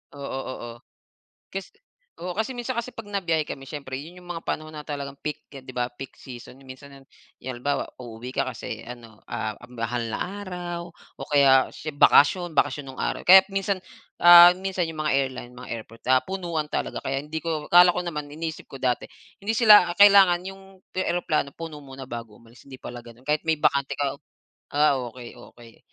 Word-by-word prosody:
Oo, 140 - -9 0.2
oo. 120 -2 -7 0.8
Kas 195 -1 -7 0.5
oo, 180 +1 -4
kasi 220 +4 -1
minsan 245 0 -4
kasi 235 +2 -3
'pag 225 -2 -9
nabiyahe 170 -6 0
kami 135 - -6
siyempre 140 -3 -6
'yon 170 +6 -10
'yong 175 - -16
mga 165 -1 -6
panahon 155 0 -4
na 150 -1 -8
talagang 140 -2 -6
peak, 150 -1 -5
'di 130 -2 -11
ba, 125 -1 -1
peak 130 +1 -10
season. 125 0 -11
Minsan 135 +1 -12
yung 135 -1 -16 0.3
halimbawa, 130 +2 -3
uuwi 120 +1 -9
ka - - +2
kasi 130 -3 -6
ano 115 -3 -11
ah, 110 -2 -4 0.2
mahal 120 0 -3
na - - -3 0.2
araw 175 -2 -6
o - - -12
kaya 135 -2 +5
sie 155 - -8
bakasyon. 165 +5 +5
Bakasyon 145 -1 +1
nung - - -9
araw. - - -2
Kaya 190 +2 +8
minsan, 195 0 -1 0.4
ah, 175 0 +10
minsan 185 -1 -2
'yong 160 -1 -6
mga - - +2
airline, 130 -3 -3
mga 125 - -10
airport, 115 0 -9
ah, 130 - +6
punuan 170 -5 -4
talaga - - -3
kaya 135 - -3
hindi 155 +1 -5
ko 155 -3 -3
akala 175 0 +7
ko - - 0
naman, 150 -4 -4
iniisip 160 +2 -6
ko 135 - -9
dati, 125 -2 -1 0.3
hindi 215 +3 -1
sila, 210 -7 +7
ah, - - -12
kailangan 195 -3 +7
'yong 195 0 -8 0.4
eroplano 175 -6 0
puno 160 -3 -7
muna 135 -1 -10
bago 115 -4 -8
umalis, 115 +2 -19
hindi 130 - -9
pala 120 -1 -8
ganun, 120 +1 -15
kahit 150 +2 +1
may 160 - +3
bakante 140 -1 +1
ka. 140 0 -2 0.5
Ah, 145 -2 +4
okey 120 0 -8 0.2
okey. 115 -2 -16
145 Hz, 185 wpm, -25 LUFS, 130-175 Hz, 0.8 s, ah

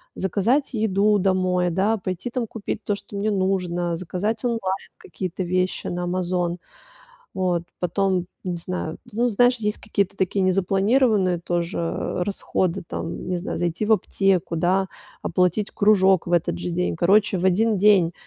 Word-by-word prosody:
заказать 225 - +1
еду 210 -1 +2
домой, 185 -1 +1
да, 200 +6 +1
пойти 185 +5 -4
там 240 -3 -2
купить 215 0 -5
то, 205 - 0
что 200 - -11
мне 205 +2 0
нужно, 180 -3 0
заказать 190 +6 -3
онлайн 235 -2 0 0.4
какие-то 185 0 -5
вещи 185 +1 -1
на 175 0 -3
"Амазон". 180 -1 -1 0.8
Вот 180 -2 0 0.2
потом, 180 0 0 0.2
не 180 -2 -2
знаю, 170 -2 -4
ну, 235 +4 0
знаешь, 245 +3 +3
есть 210 -1 -2
какие-то 200 -2 -1
такие 190 +1 0
незапланированные 195 +1 +2
тоже 175 +1 -2
расходы, 190 -2 -1
там, 165 - -5
не 180 - -1
знаю, 175 - -4
зайти 175 +4 -1
в 220 - +1
аптеку, 195 -3 +1
да, 190 +3 +2 0.4
оплатить 180 +4 +1
кружок 195 -3 +4
в - - -3
этот 170 - +1
же 175 - -3
день. 180 -1 -1
Короче, 195 +3 +3
в 180 - -1
один 210 +3 +3
день, 185 -4 +4
190 Hz, 150 wpm, -23 LUFS, 180-205 Hz, 0.8 s, кружок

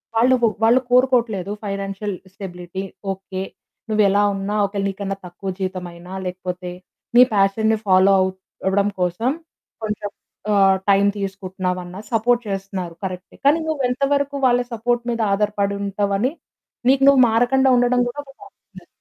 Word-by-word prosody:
వాళ్ళు 250 +3 +5
కొ - - +6 0.2
వాళ్ళు 235 +3 +5
కోరుకోవట్లేదు 240 -7 +2
ఫైనాన్షియల్ 195 0 -3 0.2
స్టెబిలిటీ. 180 -1 -7 0.3
ఓకే. 190 0 -7 0.5
నువ్వెలా 205 -1 +3
ఉన్నా, 195 +2 -3
ఒకవేళ 200 0 -3
నీకన్నా 195 0 -4
తక్కువ 185 +2 -7
జీతం 185 -1 -3
అయినా, 175 +2 -11
లేకపోతే 180 0 -5 0.5
నీ - - +10
పాషన్‌ని 215 +2 +2
ఫాలో 190 +1 +5
అవ్ 190 - +2 0.4
అవ్వడం 200 +1 +2
కోసం 180 +8 0 0.5
కొంచం 210 -1 -3 0.4
ఆహ్, 195 -1 +5
టైమ్ 200 +1 +5
తీసుకుంటున్నావన్నా 185 -1 -4
సపోర్ట్ 240 +2 +2
చేస్తున్నారు. 190 -3 -4
కరెక్టే. 185 0 -7
కానీ 300 +4 +5
నువ్వు 310 -3 -1
ఎంత 260 +3 -2
వరకు 280 0 0
వాళ్ళ 245 0 +3
సపోర్ట్ 240 +2 0
మీద 230 -1 -2
ఆధారపడి 200 -1 0
ఉంటావు 200 0 -1
అని 255 +5 +1 0.6
నీకు 270 0 +4
నువ్వు 275 -2 +7
మారకుండా 255 +4 +3
ఉండడం 245 0 +3
కూడా 245 +4 -6
ఒక 275 - -15
టాక్సిక్నెస్. 405 0 -16
200 Hz, 140 wpm, -21 LUFS, 190-240 Hz, 0.6 s, నీ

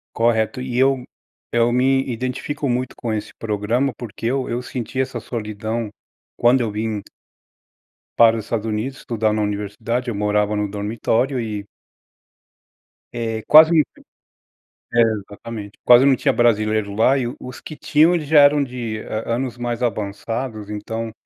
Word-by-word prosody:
Correto. 115 +2 +1
E 125 -1 -4
eu 135 0 +3 0.5
eu 120 0 +3
me 135 +2 +3
identifico 130 +5 -3
muito, 125 0 -1
com 115 -2 -3
esse 105 - -4
programa, 115 +5 0
porque 115 -2 -8
eu 130 +1 -1
eu 120 +1 -2
senti 125 0 -5
essa 130 0 -1
solidão 110 0 -4 0.5
quando 125 +2 +4
eu 115 -3 -1
vim 105 0 -3 1.2
para 115 -1 +6
os 110 - -5
Estados 115 -1 -2
Unidos, 110 +5 -3
estudar 110 -2 -1
na 105 0 0
universidade, 105 +4 -3
eu 120 - -2
morava 105 +1 +1
no 105 -1 -1
dormitório 115 +5 -1
e 105 -3 -4 1.5
É 115 -2 -3
quase 160 +1 +8 1.1
É 120 - +4
exatamente. 105 -1 -3
Quase 125 +2 +7
não 140 -1 +5
tinha - - +1
brasileiro 110 -3 +1
lá 125 +5 +4
e 130 - -1
os 125 -1 -9
que 155 - -9
tinham 155 +4 +3
eles 160 -4 -1
já 155 0 +6
eram 145 0 +5
de 120 -4 -5
an 110 +2 -3
anos 125 -1 -3
mais 120 0 -3
avançados. 110 0 -3
Então 110 +2 -4
115 Hz, 150 wpm, -21 LUFS, 110-130 Hz, 1.5 s, quase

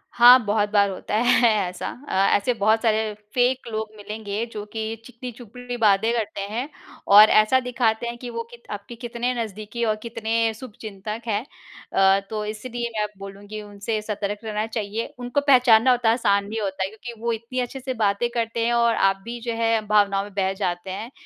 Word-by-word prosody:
हाँ, 245 +1 +9
बहुत 210 0 +1
बार 200 -1 +4
होता 195 +2 -4
है 240 +1 +4 0.2
ऐसा। 180 - -6 0.2
अ, - - -4 0.2
ऐसे 240 +5 0
बहुत 220 +1 +2
सारे 220 -2 +1 0.2
फेक 250 +1 +1
लोग 220 0 -3
मिलेंगे 210 +1 -4
जो 210 -2 -6
कि 220 0 -3
चिकनी 250 0 -8
चुपड़ी 245 +1 -8
बातें 220 0 +3
करते 220 -3 -2
हैं 245 +6 -3 0.5
और 215 +1 +10
ऐसा 215 +5 +5
दिखाते 240 -2 0
हैं 235 0 -5
कि 245 0 -7
वो 230 -1 -4
कीत 235 0 -14
आपके 205 +3 -7
कितने 240 +1 -3
नज़दीकी 215 +2 -6
और 215 -1 +1
कितने 230 0 -1
शुभचिंतक 215 -2 -7
हैं। 220 +3 -1 0.5
अ, 195 0 +5
तो 215 -1 -3
इसीलिए 235 +3 -4
मैं 210 - +1
बोलूँगी 200 +2 -8
उनसे 210 +1 -4
सतर्क 205 -1 -3
रहना 215 -1 -2
चाहिए, 220 0 -4
उनको 245 +3 -1
पहचानना 250 -2 +6
उतना 240 -2 +2
आसान 200 -4 +2
नहीं 220 +1 -4
होता 190 -2 -2
है 190 - -2
क्योंकि 225 +1 -10
वो 235 0 0
इतनी 230 +3 -5
अच्छे 250 +2 -3
से 260 0 -4
बातें 215 0 +1
करते 230 -1 -1
हैं 240 - +1
और 235 -1 +3
आप 195 0 +3
भी 240 +1 -6
जो 235 0 -3
है 225 0 +2
भावनाओं 200 -2 +3
में 205 - -11
बह 190 -1 0
जाते 185 -1 -3
हैं, 215 +6 -6
220 Hz, 190 wpm, -23 LUFS, 205-235 Hz, 0.5 s, और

